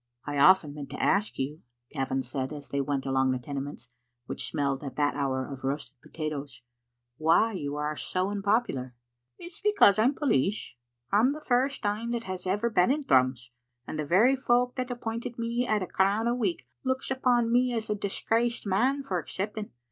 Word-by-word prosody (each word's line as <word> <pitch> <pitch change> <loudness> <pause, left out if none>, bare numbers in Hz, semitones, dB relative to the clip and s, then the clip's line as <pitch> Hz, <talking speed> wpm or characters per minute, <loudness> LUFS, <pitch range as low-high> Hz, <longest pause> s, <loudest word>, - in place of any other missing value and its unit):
I 145 -1 -2
often 155 -1 +6
meant 145 -2 -7
to 140 - -7
ask 200 +2 +2
yon," 145 +4 -3 0.3
Gavin 135 -2 -1
said 130 +2 -3
as 145 -2 -8
they 140 - 0
went 140 -1 -2
along 135 0 +2
the 130 - +1
Tenements, 135 -1 -6 0.3
which - - -3
smelled 140 -2 -1
at 135 -3 -6
that 145 0 +1
hour 130 -2 -1
of 135 -2 -8
roasted 135 -1 -4
potatoes, 145 -5 -5 0.5
"why 165 +8 +4
you 145 -6 -3
are 150 +1 -2
so 185 +5 -1
unpopular." 200 - 0 0.4
"It's 345 -1 -9
because 405 - +5
I'm 255 +6 +3
police. 205 - 0 0.4
I'm 225 +7 +4
the 305 - -7
first 265 -3 0
ane 210 +3 -1
that 235 -1 -2
has 185 -2 -5
ever 210 +5 0
been 180 -1 +4
in 290 +2 +1
Thrums, 130 - +2 0.3
and 155 - -5
the - - 0
very 220 - +5
folk 245 -1 +2
that 255 -1 -3
appointed 235 -1 -4
me 235 +1 -1
at 210 -3 +1
a - - -5
crown 200 +4 +1
a 240 - +2
week 200 - -1 0.2
looks 260 +1 -1
upon 245 -3 +2
me 250 +1 +3
as 225 -2 -2
a 210 - +1
disgraced 225 +4 -1
man 255 +9 +1
for 185 -8 -1
accepting. 205 +5 -4
190 Hz, 185 wpm, -28 LUFS, 140-235 Hz, 0.5 s, often